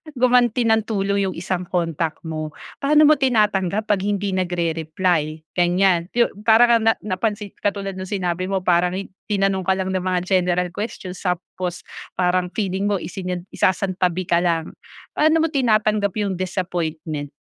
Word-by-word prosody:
gumanti 245 -1 +3
ng 220 -1 +2
tulong 200 -2 0
yung 185 - -4
isang 180 +1 -3
kontak 165 -3 -1
mo? 155 -2 -5 0.2
Paano 300 +2 +4
mo 305 - +5
tinatanggap 210 -5 +1
'pag 205 - +2
hindi 205 -1 -1
nagre-reply 165 -3 -1
ganiyan, 175 0 +3
yung 240 -1 +3 0.2
para 225 +1 +7
ka 235 - +6
ng 225 0 +1
napansin 210 +1 -2
katulad 200 -1 -2
ng 190 0 -5
sinabi 185 -2 -2
mo, 195 -1 -1
parang 180 0 +2 0.3
tinanong 195 -2 0
ka 190 - +4
lang 190 0 -2
ng 190 - 0
mga 185 0 0
general 180 -1 +1
questions 190 -2 -6
tapos 180 -1 -3 0.3
parang 180 0 +1
feeling 195 -2 -1
mo 205 - +1
isinan 180 +1 -5
isasantabi 185 -1 0
ka 170 - +4
lang. 170 -2 0 0.4
Paano 315 +1 +3
mo 325 - 0
tinatanggap 215 - +2
yung 195 -3 -2
disappointment? 165 -5 -3
185 Hz, 150 wpm, -21 LUFS, 175-210 Hz, 0.4 s, para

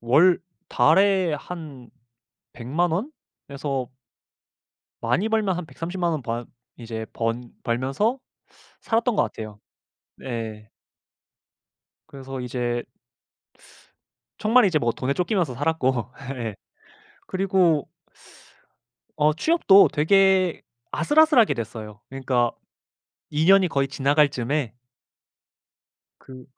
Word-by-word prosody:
월 155 +10 +4 0.3
달에 190 +6 +3
한 150 -6 -9 0.6
1,000,000 150 +9 -1
원에서 140 - -5 1.1
많이 145 - +1
벌면 215 -5 +1
한 180 -2 -5
1,300,000 175 +2 -3
원 155 -4 -3
바 120 0 -4 0.3
이제 115 -2 -6
번 115 +1 -3
벌면서 135 - 0 0.6
살았던 230 0 0
것 - - +4
같아요. 110 -2 -7 0.6
네. 110 -4 -6 1.4
그래서 135 -1 -8
이제 120 -1 -2 1.5
정말 230 +3 +4
이제 175 -6 +3
뭐 120 -4 0
돈에 130 +1 -2
쫓기면서 180 - 0
살았고. 130 -4 -1 0.3
예. 115 -4 -4 0.7
그리고 185 -5 +1 1.3
어 150 0 +3
취업도 200 - +5
되게 190 +2 +3 0.3
아슬아슬하게 295 - +4
됐어요. 110 -3 -7
그러니까 130 -3 0 0.8
2 150 +2 0
년이 190 0 +5
거의 140 -3 0
지나갈 140 +2 +2
쯤에 130 -1 -2 1.5
그 130 -1 -13
145 Hz, 180 characters per minute, -24 LUFS, 120-185 Hz, 1.5 s, 취업도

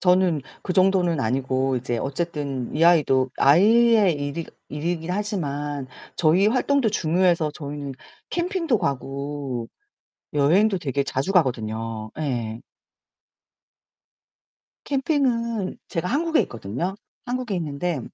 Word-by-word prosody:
저는 180 -4 +3 0.2
그 180 - -1
정도는 185 -5 +3
아니고 130 +2 0
이제 120 -1 -2
어쨌든 140 -3 -3
이 165 - +3
아이도 135 -6 +4
아이의 210 +4 +5
일이 145 +3 -4 0.2
일이긴 165 +3 -3
하지만 145 -9 -3 0.3
저희 175 +5 +4
활동도 255 -1 +2
중요해서 170 -3 +2
저희는 145 -2 -6 0.4
캠핑도 345 - 0
가고 140 -3 -3 0.7
여행도 185 +8 +3
되게 140 -2 -1
자주 135 +9 -2
가거든요. 115 - 0
예. 120 -6 -2 2.3
캠핑은 245 - 0
제가 170 0 -2
한국에 320 - +1
있거든요. 125 - -4 0.3
한국에 245 -4 -2
있는데 155 -1 -2
160 Hz, 250 characters per minute, -24 LUFS, 135-195 Hz, 2.3 s, 아이의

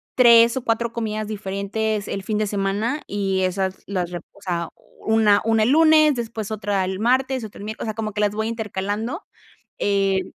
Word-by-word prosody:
3 235 0 +6
o 260 - -3
4 235 -1 0
comidas 215 -2 -3
diferentes 210 +1 -3
el 195 - -4
fin 215 +1 -1
de 215 - 0
semana. 205 +8 -1
Y 195 -2 -1
esas 190 0 -2
las 185 -3 -2
rep 175 -2 -6
o 200 - -21
sea, 170 -3 -3 0.4
una 220 -2 +4
una 225 -1 +3
el 220 - +2
lunes, 310 0 +5
después 225 -3 -4
otra 205 -2 -1
el 190 +1 -3
martes, 255 +2 +1
otra 210 - -9
el 205 - -7
miércoles, 220 +2 -5
o - - -5
sea, - - -2
como 215 -1 -4
que 210 - -2
las 205 - +2
voy 220 +1 -2
intercalando. 220 - -3 0.6
Eh, 195 -2 +1
215 Hz, 195 wpm, -22 LUFS, 195-230 Hz, 0.6 s, 3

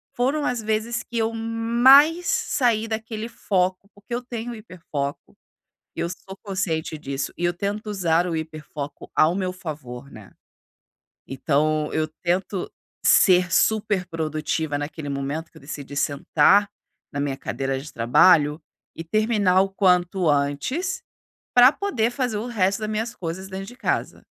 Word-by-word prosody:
foram 275 +5 0
as 245 -2 -1
vezes 220 +2 -1
que 235 - -6
eu 225 0 0
mais 240 +9 +5
saí 225 -4 +1
daquele 220 0 -4
foco, 190 -3 -1
porque 205 +4 -10
eu 245 - -1
tenho 240 -1 -6
hiperfoco, 165 -10 -6 0.6
eu 170 - -1
sou 190 +2 -9
consciente 170 -6 -2
disso. 135 -2 -4
E 175 - -5
eu 175 - +1
tento 205 +4 -3
usar 175 -4 +1
o 165 - -2
hiperfoco 150 -2 -7
ao 155 +3 +4
meu 185 -2 -1
favor, 140 -7 -8
né? 105 -3 -13 1.0
Então, 150 +3 0
eu 155 0 0
tento 180 +1 -1 0.3
ser 180 -2 +5
super 210 -4 +2
produtiva 155 -2 -2
naquele 145 0 -6
momento 140 +4 -3
que - - -18
eu - - -15
decidi 140 0 -8
sentar 160 +8 +3 0.4
na 145 - -4
minha 140 -2 -2
cadeira 135 +1 -3
de 150 +3 -10
trabalho 150 +6 +4 0.3
e 165 - -7
terminar 205 0 +2
o 195 - 0
quanto 180 -2 +2
antes 145 - 0 0.5
pra 250 +3 +8
poder 245 - 0
fazer 245 -5 -1
o 230 - -4
resto 195 -5 +1
das 215 - -3
minhas 220 +2 -2
coisas 185 +2 -5
dentro 195 0 -6
de 245 +3 -11
casa. - - -2
185 Hz, 150 wpm, -23 LUFS, 155-220 Hz, 1.0 s, pra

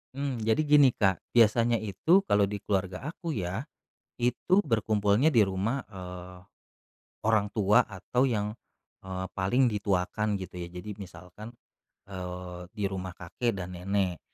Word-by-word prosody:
Mmm, 135 -5 -3
jadi 110 +6 +3
gini, 145 -2 +6
Kak. 95 -3 +1
Biasanya 115 0 +4
itu 110 - +3
kalau 100 0 +4
di 100 0 -5
keluarga 95 +6 -2
aku 165 0 -5
ya, 95 +4 -3 0.5
itu 125 +10 +2
berkumpulnya 110 - +2
di 120 - +4
rumah, 100 +8 -1
eee, 90 -2 -9 0.8
orang 110 -2 +1
tua 105 -1 +4
atau 110 +6 -1
yang, 105 -5 0 0.6
eee, 95 0 -4
paling 120 +7 +3
dituakan 105 0 0
gitu 90 -1 -8
ya. 85 -1 -5
Jadi 100 +3 -7
misalkan, 95 +3 -10 0.5
eee, 90 -2 -7 0.2
di 105 - -2
rumah 95 -2 -4
kakek 100 +6 -2
dan 90 -1 -6
nenek. 90 -1 -1
100 Hz, 140 wpm, -28 LUFS, 95-115 Hz, 0.8 s, gini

